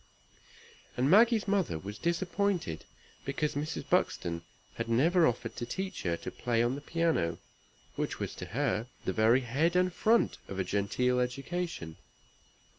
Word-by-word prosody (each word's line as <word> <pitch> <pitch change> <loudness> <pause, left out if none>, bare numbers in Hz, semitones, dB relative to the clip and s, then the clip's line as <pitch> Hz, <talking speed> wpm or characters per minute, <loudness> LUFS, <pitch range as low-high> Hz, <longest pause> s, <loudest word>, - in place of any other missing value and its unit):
And 130 +4 +2
Maggie's 220 +1 +5
mother 195 - +1
was 100 +6 -7
disappointed 175 - -1 0.4
because 145 +2 -1
Mrs. 150 +2 -3
Buxton 85 -1 +1 0.4
had - - -3
never 160 +9 +4
offered 120 -1 -2
to 120 - -3
teach 190 +8 -4
her 85 -2 0
"to - - -6
play 120 -2 0
on 120 +2 +1
the 140 - -5
piano," 160 - 0 0.6
which - - -2
was - - -3
to - - -5
her 115 +1 -1 0.2
the 95 - 0
very 115 +5 +4
head 145 +8 +1
and 180 0 +3
front 225 +5 +2
of 95 - -6
a 95 - +1
genteel 105 +7 +1
education. 130 - -3
135 Hz, 150 wpm, -31 LUFS, 110-175 Hz, 0.6 s, Maggie's